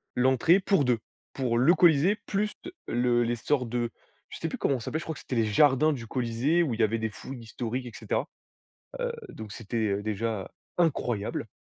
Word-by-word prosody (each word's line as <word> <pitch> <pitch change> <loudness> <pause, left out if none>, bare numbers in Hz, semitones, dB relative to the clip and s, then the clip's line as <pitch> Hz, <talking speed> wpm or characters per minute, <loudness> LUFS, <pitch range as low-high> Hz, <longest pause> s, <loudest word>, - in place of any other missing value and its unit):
l'entrée 130 +8 +4
pour 190 -7 +2
2 120 -3 +2 0.3
Pour 125 -3 0
le 135 +8 +6
Colisée, 175 +2 +5
plus 210 +1 -1
de 355 - -8
le 120 0 +2
les 120 +1 0
sorts 125 +2 0
de 120 0 -1 0.4
je - - -8
sais - - -2
plus - - -4
comment 135 -2 +1
ça 115 - -8
s'appelle! 155 - -2
Je - - -8
crois 160 - -4
que - - -9
c'était 130 - -4
les 115 -1 +3
jardins 145 +6 +4
du 115 -5 -6
Colisée, 130 +8 +1
où 135 - -1
il 115 - -5
y - - +4
avait 110 +1 +1
des 110 - -1
fouilles 130 +4 -8
historiques, 120 +2 -4
et - - -7
cetera. - - -2 0.7
Heu, - - 0 0.2
donc, 110 -1 -8
c'était, 115 +1 -5
heu, 100 0 -1
déjà, 110 -1 -2 0.3
incroyable! 125 -11 0
125 Hz, 210 wpm, -28 LUFS, 115-150 Hz, 0.7 s, le